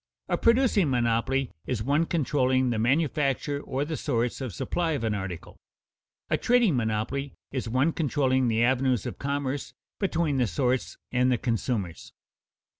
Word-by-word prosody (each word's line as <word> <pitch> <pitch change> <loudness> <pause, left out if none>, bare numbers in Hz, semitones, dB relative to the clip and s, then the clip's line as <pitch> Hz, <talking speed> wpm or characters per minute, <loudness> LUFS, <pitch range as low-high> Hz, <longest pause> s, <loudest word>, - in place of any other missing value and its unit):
A - - +1
producing 230 - +3
monopoly 125 +2 +1 0.2
is 115 -4 -1
one 145 +6 +2
controlling 130 -5 +1
the 115 - -1
manufacture 140 +2 +1
or 135 +1 -2
the 160 +1 -3
source 120 -4 -1
of 130 -4 -3
supply 165 - -1
of 140 - -2
an 110 -1 0
article; 95 -4 -6 0.7
a - - +1
trading 235 - +3
monopoly 115 +4 -2 0.2
is 130 -4 -3
one 130 +7 +2
controlling 130 -5 +1
the 115 0 +2
avenues 125 -2 +2
of - - -5
commerce 140 0 -2 0.3
between 170 -7 0
the 125 -3 +2
source 125 +5 -1
and 125 +1 +2
the 125 - +2
consumers. 100 - -3
130 Hz, 150 wpm, -27 LUFS, 120-145 Hz, 0.7 s, producing